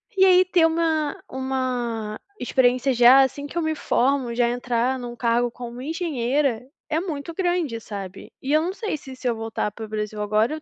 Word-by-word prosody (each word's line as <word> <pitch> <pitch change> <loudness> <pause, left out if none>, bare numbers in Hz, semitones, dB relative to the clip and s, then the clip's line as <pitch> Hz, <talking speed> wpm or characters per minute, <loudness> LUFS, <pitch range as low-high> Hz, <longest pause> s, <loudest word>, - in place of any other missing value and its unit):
e 380 0 +6
aí 370 0 +6
ter 350 -3 +4
uma 320 -2 0
uma 250 -5 -2 0.2
experiência 255 +1 +2
já, 245 +3 +7
assim, 285 +2 -3
que 345 - -8
eu - - +2
me 315 0 -1
formo. 260 -3 +1
Já 240 0 +2
entrar 245 +1 0
em - - -8
um 240 0 -6
cargo 235 0 +1
como 240 0 -8
engenheira 280 -5 0 0.3
é 315 0 +1
muito 330 -2 -5
grande, 350 -10 -1
sabe. 195 -3 -8
E 275 +3 -1
eu 310 - +5
não 355 +3 -1
sei 425 -6 -3
se 265 -3 -9
se 255 - -4
eu 235 - +1
voltar 225 -2 -3
para 220 +1 -7
o - - -11
Brasil 210 0 -4
agora, 215 +6 +1
eu 310 - -6
255 Hz, 205 wpm, -23 LUFS, 235-310 Hz, 0.3 s, já